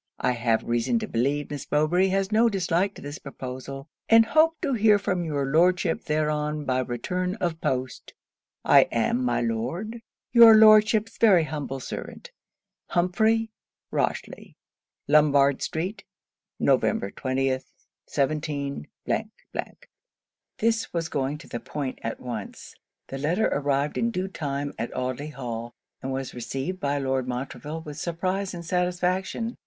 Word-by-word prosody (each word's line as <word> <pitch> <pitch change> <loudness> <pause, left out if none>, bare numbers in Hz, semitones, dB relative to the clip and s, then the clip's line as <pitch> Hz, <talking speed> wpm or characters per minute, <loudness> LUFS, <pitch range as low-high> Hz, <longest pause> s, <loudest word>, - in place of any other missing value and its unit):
'I 125 - +1
have 115 -2 +1
reason 120 - 0
to 220 -1 -3
believe 140 - -1
Miss 145 -2 -6
Mowbray 160 +6 +3
has 195 +1 0
no 225 +2 +4
dislike 190 0 0
to - - -11
this 145 +2 -6
proposal; 135 +1 -7 0.2
and 225 0 +7
hope 315 +6 +3
to 290 -6 0
hear 215 -2 +5
from 185 -3 -1
your 145 -4 -1
Lordship 170 +4 +2
thereon 150 -1 -1
by 130 -1 +1
return 180 - -2
of 170 -6 -3
post. 130 0 -3 0.5
I - - +6
am, 120 +2 +1
my 120 -1 +1
Lord, 130 - -3 0.3
your 230 -2 +9
Lordship's 215 0 +5
very 195 -7 +6
humble 145 -3 -4
servant, 485 - -7 0.6
HUMPHREY 220 +5 +1 0.4
ROCHELY.' - - -3 0.5
Lombard 140 -2 +4
street, 180 +7 -3 0.6
Nov. - - +4
20th. 130 +5 -1 0.4
17. 145 0 -2 1.7
This 225 0 0
was 165 -2 -2
going 140 +1 -1
to - - -14
the 120 - -5
point 140 -1 -5
at 115 - -4
once. 120 -5 -7 0.4
The 135 - -5
letter 170 +10 +1
arrived 140 +1 0
in 230 - +1
due 190 -3 -3
time 145 -5 -3
at 115 - -4
Audley 130 +3 -3
Hall; 120 -4 -6 0.3
and 135 - -4
was 135 -1 -4
received 135 +9 -4
by 145 -3 0
Lord 130 -2 -1
Montreville 140 +5 -5
with 150 -1 -8
surprise 185 +4 -2
and 170 -1 -8
satisfaction. 180 +6 -1
150 Hz, 140 wpm, -26 LUFS, 135-190 Hz, 1.7 s, your